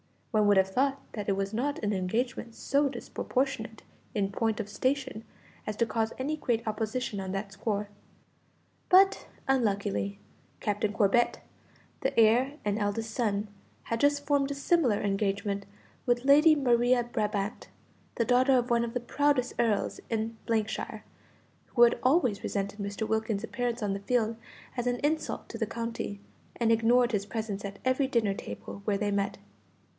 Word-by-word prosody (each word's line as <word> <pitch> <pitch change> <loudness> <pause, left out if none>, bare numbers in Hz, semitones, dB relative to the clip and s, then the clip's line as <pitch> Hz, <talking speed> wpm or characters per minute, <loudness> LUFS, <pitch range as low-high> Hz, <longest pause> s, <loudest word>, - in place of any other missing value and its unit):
One 215 -3 +3
would 205 -1 +5
have 190 0 +4
thought 275 +6 +1
that 210 -2 -5
it - - +3
was 195 +1 -2
not 280 +6 -1
an 205 0 +1
engagement 230 +5 -2
so 285 +1 +1
disproportionate 260 -4 -3 0.3
in 200 -2 0
point 225 +2 0
of 210 -2 -4
station 260 0 -1 0.4
as 215 - -2
to 235 - +2
cause 225 0 -1
any 295 +4 -2
great 235 -6 -1
opposition 215 0 -2
on 190 -1 -4
that 195 +1 -3
score; 205 0 -2 1.0
but, 385 +1 +5 0.2
unluckily, 200 - 0 0.4
Captain 210 0 0
Corbet, 220 +3 +2 0.6
the - - -2
heir 240 +5 +5
and 205 +1 0
eldest 220 +2 -1
son, 210 -3 -1 0.3
had 230 - -2
just 285 +1 +2
formed 285 -1 +2
a 285 - -3
similar 280 - +2
engagement 200 0 -1 0.4
with 240 +1 +2
Lady 300 +3 +7
Maria 245 -2 +3
Brabant, 210 -3 -2 0.5
the 230 - +1
daughter 255 +2 +4
of 245 0 0
one 235 0 +3
of 230 - -6
the 245 - 0
proudest 270 0 +1
earls 225 -4 +1
in 225 0 -2 0.3
shire, - - -5 0.7
who 240 - +7
had 240 0 +5
always 255 - +3
resented 200 +1 -3
Mr. 200 +2 -3
Wilkins's 220 -1 -1
appearance 240 0 -2
on 200 -1 0
the 200 - -3
field 225 +1 0 0.4
as 245 0 -1
an 245 - +2
insult 310 +1 -1
to 230 - -6
the 220 - 0
county, 230 -3 -4 0.3
and 230 -1 +2
ignored 235 +2 +4
his 205 -3 0
presence 210 -3 -4
at 200 0 -7
every 260 +1 +2
dinner 230 -6 +1
table 200 - -8
where 205 -2 +1
they 205 0 -1
met. 200 0 -1
225 Hz, 160 wpm, -29 LUFS, 205-250 Hz, 1.0 s, Lady